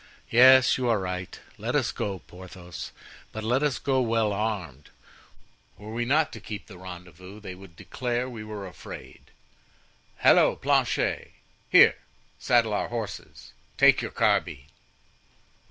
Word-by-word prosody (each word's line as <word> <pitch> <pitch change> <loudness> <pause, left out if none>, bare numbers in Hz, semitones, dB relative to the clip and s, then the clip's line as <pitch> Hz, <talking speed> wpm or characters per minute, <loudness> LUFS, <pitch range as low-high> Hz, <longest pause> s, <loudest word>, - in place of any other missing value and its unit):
Yes, 130 +2 +6
you 125 -1 0
are 115 - +3
right; 90 -1 -5 0.2
let - - -3
us - - +1
go, 100 -2 -4
Porthos, 90 -1 -10 0.4
but 110 - -6
let 125 +5 +1
us 145 -3 0
go 135 -2 0
well 115 -3 +1
armed; 100 -9 -4 0.9
were 105 +2 -9
we 120 +1 -2
not 150 +4 +2
to 110 - -8
keep 105 -1 -8
the 95 -4 -13
rendezvous, 90 +1 -11
they 100 -3 -8
would 90 -2 -14
declare 125 +7 -3
we 115 -4 -8
were 105 -2 -7
afraid. 90 - -11 0.9
Halloo! - - +5
Planchet! - - 0 0.4
here! - - +7 0.4
saddle 115 -3 +2
our - - -1
horses, 115 -3 -7 0.2
take - - +5
your - - -4
carbine." 65 -1 0
105 Hz, 140 wpm, -26 LUFS, 95-120 Hz, 0.9 s, here